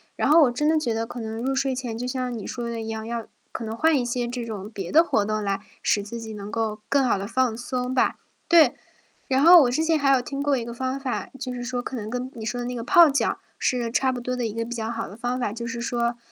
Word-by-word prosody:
然 - - 0
后 320 +3 +7
我 255 - +4
真 295 +5 0
的 315 0 +4
觉 240 -6 -1
得 225 0 -1
可 245 +1 -8
能 225 0 -5
入 270 +1 0
睡 265 -1 0
前 245 -3 -4
就 245 +2 -3
像 250 -2 -2
你 210 - -7
说 240 -2 -4
的 230 -1 -4
一 220 - -6
样， 220 0 -4
要 230 -1 -4 0.2
可 235 - -5
能 220 0 -4
换 320 -1 +4
一 - - 0
些 240 0 -1
这 245 0 -4
种 210 -3 -6
别 195 -5 -6
的 325 +3 +7
活 215 -10 +1
动 215 0 -1
来 200 -1 -1 0.2
使 205 - +2
自 230 +3 -7
己 220 -1 -7
能 205 -1 -7
够 220 -2 -2
更 280 -1 +3
好 230 -5 +2
地 200 - -4
放 250 -1 +1
松 250 +1 -3
吧。 260 - +2 0.3
对， 320 -7 +6 0.6
然 265 +1 +2
后 340 0 +9
我 245 - +2
之 290 +6 +1
前 320 -1 +2
还 275 -1 +2
有 265 - +4
听 275 +3 -4
过 285 -1 +2
一 235 - -3
个 235 - -6
方 260 +2 -2
法， 265 -2 -3
就 255 -1 -4
是 245 - -5
说 245 0 -2
可 260 - -5
能 215 -3 -5
跟 250 +1 -3
你 225 - -7
说 245 +3 -2
的 240 - -3
那 250 - -3
个 235 - -4
泡 340 +5 +7
脚 275 - 0 0.2
是 250 - +1
个 235 -1 -2
差 260 +2 +2
不 245 - -4
多 250 +1 -3
的 245 -2 -1
一 215 - -3
个 230 +1 -2
比 240 +1 -6
较 225 -1 -3
好 230 -1 -4
的 200 - -11
方 245 +2 -2
法， 240 - 0
就 235 +1 -5
是 235 0 -4
说 240 -1 -1
245 Hz, 320 characters per minute, -24 LUFS, 225-260 Hz, 0.6 s, 后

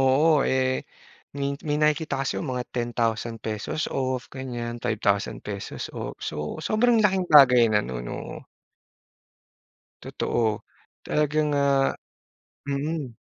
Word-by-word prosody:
Oo, 145 +4 +4
eh, 130 0 +1 0.6
min 140 0 -2
may 150 -3 -1
nakikita 150 -2 +1
kasi - - -2
ako - - -4
mga 125 - -2
₱10,000 115 +1 -2
off, 130 -1 -2
ganiyan, 120 -3 -5
₱5,000 100 -1 -2
off. - - -6
So, 75 0 -4
sobrang 220 +7 +2
laking 190 -3 +2
bagay 125 -6 +7
na 105 -1 +2
no'n, - - -5
oo. - - -7 1.6
Totoo. 110 -3 -1 0.4
Talagang, 150 0 +1
ah 140 -1 +3 0.8
mm. 140 -3 -3
130 Hz, 110 wpm, -25 LUFS, 115-150 Hz, 1.6 s, bagay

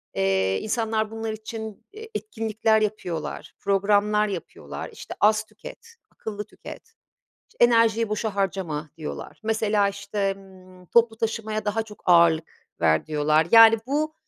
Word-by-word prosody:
Eee, 95 0 +1
insanlar 220 -1 -1
bunlar 225 0 -4
için, 220 -1 -8
eee, 445 +1 -10
etkinlikler 220 - 0
yapıyorlar, 185 -6 -4
programlar 205 +2 +2
yapıyorlar. 190 -4 -7
İşte - - -9
az 215 +1 +4
tüket, 465 - -13 0.2
akıllı 210 -1 -6
tüket. - - -12 0.6
İşte - - +4
enerjiyi 230 -2 +3
boşa 215 -1 -2
harcama 175 -6 -2
diyorlar. 155 -2 -7
Mesela 215 -2 +1
işte, 200 0 -2
ımm, 185 -2 -17
toplu 230 +1 +3
taşımaya 220 -1 -2
daha 210 +2 0
çok 215 -1 -14
ağırlık 170 -2 +3
ver 80 - +2
diyorlar. 155 +1 +2
Yani, 225 0 +8
bu 305 +3 -1
210 Hz, 130 wpm, -24 LUFS, 185-225 Hz, 0.6 s, Yani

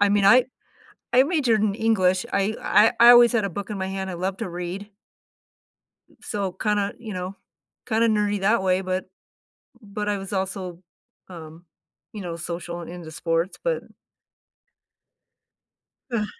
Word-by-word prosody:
I 205 - +5
mean, 205 -1 +2
I 245 +5 +7 0.7
I 255 +1 +6
majored 270 - +1
in 205 -2 +1
English, 200 -3 +2
I 200 +2 +1
I 215 +2 +4
I 235 +1 +10
always 240 0 +8
had 225 -4 +1
a 200 - -2
book 200 +4 -6
in 205 - -4
my 190 - -2
hand, 190 0 -4
I - - -5
love 185 +2 -3
to 225 - -4
read. 180 +4 -6 1.3
So, 200 -4 -3
kinda, 205 +1 -1
you 225 -3 -7
know 185 +1 -5 0.5
kinda 225 0 +2
nerdy 210 -2 +1
that 215 +2 +3
way, 185 0 +2
but 185 0 -2 0.8
but 210 0 -5
I 205 -1 0
was 195 +1 -8
also, 190 -2 -4 0.5
um, 165 -1 -11 0.5
you 210 - -7
know, 170 -2 -5
social 170 +1 -6
and 170 - -8
into 170 -3 -9
sports, 165 +3 -1
but - - -1 2.3
Ugh. 215 -3 0
195 Hz, 155 wpm, -24 LUFS, 180-215 Hz, 2.3 s, I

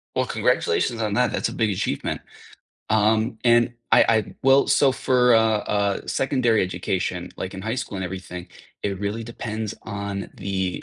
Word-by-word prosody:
Well, - - +1
congratulations 415 - 0
on 105 -2 -1
that, 125 +3 +2
that's - - -1
a - - -7
big 110 -2 +1
achievement. 100 -1 -2 0.7
Um, 110 +1 +2
and 120 0 +4 0.2
I - - +7
I, 110 -1 +1
well, 135 +1 +5
so 135 -2 +4
for, 125 -2 +3
uh, 115 - +6 0.2
uh, 100 -1 0
secondary 130 -5 +1
education, 95 0 -2
like, 95 +1 -5
in 95 - -7
high 110 +3 -2
school 125 -5 -4
and 95 - -3
everything, 90 -1 -7 0.3
it 100 -2 -2
really 105 +3 -3
depends 110 -2 -5
on 100 -2 -5
the 95 -2 -3
110 Hz, 165 wpm, -23 LUFS, 100-120 Hz, 0.7 s, I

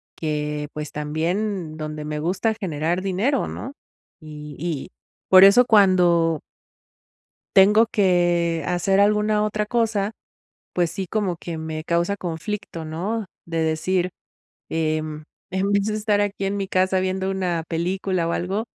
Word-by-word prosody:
que, 150 -1 -3
pues, 150 -1 -5
también 165 +4 -2
donde 155 -1 -5
me 150 0 -3
gusta 185 +7 0
generar 170 -1 -1
dinero, 200 +9 0
¿no?, 265 - -6 0.5
y 150 -1 -9
y 160 -4 -3 0.4
por 185 0 +9
eso 200 +6 +8
cuando 175 -7 +4 1.2
tengo 210 +4 +7
que 175 -5 +2
hacer 185 +2 +2
alguna 210 +1 +3
otra 210 0 -1
cosa, 220 -2 0 0.6
pues 175 -2 +1
sí, 190 +2 -4
como 195 -3 -1
que 165 -1 -6
me 160 0 -5
causa 170 +4 0
conflicto, 175 -1 -5
¿no?, 190 +8 -3 0.2
de 165 -1 -3
decir, 175 +3 0 0.6
em: 155 -1 -2 0.3
"En 190 +2 0
vez 200 0 +2
de 215 - -1
estar 210 -1 +1
aquí 200 -1 -1
en 200 +1 -1
mi 195 - -2
casa 185 0 +2
viendo 190 +1 -1
una 180 -4 -1
película 180 +1 -1
o 170 - -1
algo", 195 +5 -2
180 Hz, 140 wpm, -23 LUFS, 160-200 Hz, 1.2 s, por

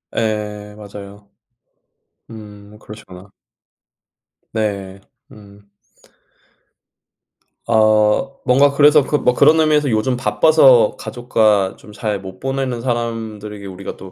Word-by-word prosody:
예 105 -1 -4
맞아요. 100 0 -12 1.0
음 105 -1 -13
그러시구나. 100 -3 -13 1.2
네. 100 -3 -4 0.3
음. 100 -1 -17 2.0
어 110 +3 +2
뭔가 140 +3 +4
그래서 150 0 +5
그 150 - -1
뭐 125 - +1
그런 155 +5 +4
의미에서 150 -3 +2
'요즘 110 +3 0
바빠서 135 -3 +4
가족과 110 -5 0
좀 105 - -16
잘 105 -2 -4
못 95 -1 -11
보내는 135 -3 -3
사람들에게 110 -4 -5
우리가 95 0 -8
또 95 -1 -12
110 Hz, 210 characters per minute, -18 LUFS, 100-125 Hz, 2.0 s, 그래서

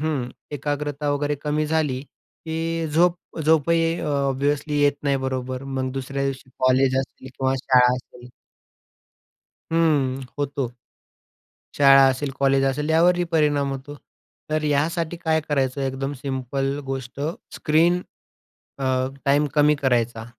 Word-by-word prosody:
हं. 150 -6 -1 0.2
एकाग्रता 145 0 -2
वगैरे, 145 +1 0
कमी 150 0 0
झाली 150 -4 0
की 165 +2 -5
झोप 170 +3 +3 0.3
झोपही 165 +2 +2
ऑब्व्हियसली 145 +1 0
येत 145 0 +4
नाही 140 -1 +1
बरोबर. 130 0 -3
मग, 130 -1 -3
दुसऱ्या 135 +1 -3
दिवशी 135 -1 -4
कॉलेज 130 +1 +3
असेल 130 0 -6
किंवा 130 0 +1
शाळा 125 -1 +5
असेल. 125 -1 -12 1.4
हं. 145 -6 +2 0.2
होतो. 140 -2 -1 1.1
शाळा 135 -1 +7
असेल, 135 +2 -1
कॉलेज 135 0 +3
असेल, 145 +3 -1
यावरही 175 +2 +4
परिणाम 145 -3 +2
होतो. 135 +2 -7 0.6
तर, 155 0 0
यासाठी 160 +3 0
काय 160 -2 +1
करायचं, 135 -1 0
एकदम 135 +1 -2
सिंपल 135 0 -2
गोष्ट 135 0 -5 0.3
स्क्रीन 170 +4 +2 0.8
अ, 135 - -3 0.4
टाइम 145 +2 +3
कमी 150 0 +5
करायचा. 120 -4 0
140 Hz, 120 wpm, -23 LUFS, 135-150 Hz, 1.4 s, शाळा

